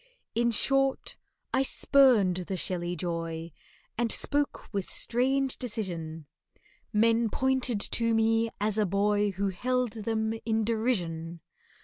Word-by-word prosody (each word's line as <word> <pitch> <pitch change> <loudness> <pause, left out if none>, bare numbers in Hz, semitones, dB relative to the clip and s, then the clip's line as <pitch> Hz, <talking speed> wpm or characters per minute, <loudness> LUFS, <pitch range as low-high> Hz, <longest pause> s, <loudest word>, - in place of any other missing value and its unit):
In 235 +1 +2
short, 270 +4 +1 0.4
I 265 - +3
spurned 255 -9 +4
the 190 - -3
shelly 175 +1 -2
joy, 165 -1 -4 0.5
And 235 -2 +1
spoke 290 0 0
with 195 -2 -2
strange 265 +2 0
decision— 170 -10 -4 0.7
Men 230 +1 +3
pointed 260 -2 0
to 230 +1 +1
me 225 +1 +2
as 210 +1 0
a 210 - +2
boy 205 +2 +2
Who 195 +2 -1
held 250 +5 -1
them 220 0 -2
in 225 -1 0
derision. 175 -8 -1
220 Hz, 120 wpm, -28 LUFS, 185-240 Hz, 0.7 s, spurned